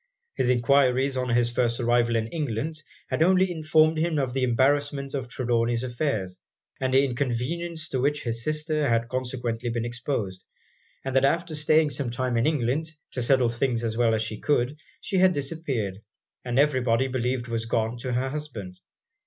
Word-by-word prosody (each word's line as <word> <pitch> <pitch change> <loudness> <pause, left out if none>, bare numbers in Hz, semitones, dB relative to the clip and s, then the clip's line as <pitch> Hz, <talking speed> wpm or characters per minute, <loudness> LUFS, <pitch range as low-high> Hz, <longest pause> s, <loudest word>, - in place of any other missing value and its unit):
His 125 - 0
enquiries 130 +2 +3
on 125 -1 -1
his 120 0 +2
first 120 0 0
arrival 120 -1 +2
in 110 -1 +1
England 155 +1 -3 0.3
had - - 0
only 185 +2 +4
informed 155 -1 +3
him 165 -1 0
of 130 -3 -1
the 135 - -1
embarrassment 140 +3 +1
of 130 -3 -3
Trelawny's 120 -1 0
affairs, 120 -8 -2 0.4
and 130 -1 0
the 135 +1 +5
inconvenience 140 +6 -2
to 130 - -1
which 145 +3 0
his 115 -1 -2
sister 155 -1 0
had 115 0 +1
consequently 125 -2 -3
been 115 0 -2
exposed; 120 -6 -3 0.6
and 135 -1 -3
that 135 - +4
after 165 +4 +1
staying 155 0 +3
some 140 -4 -2
time 125 0 -1
in 115 +3 +2
England, 150 +1 0 0.2
to 125 - -3
settle 125 0 +3
things 120 0 0
as 110 -1 -1
well 115 -1 +3
as 110 - 0
she 110 -1 -5
could, 140 -1 +1 0.3
she 195 - -2
had 185 0 +5
disappeared, 135 - -3 0.4
and 125 0 -2
every 140 -2 +3
body 125 +2 +2
believed 125 -1 -2
was 115 -1 -2
gone 115 +1 0
to 125 0 -3
her 130 +2 0
husband. 115 -11 -6
130 Hz, 175 wpm, -26 LUFS, 120-145 Hz, 0.6 s, the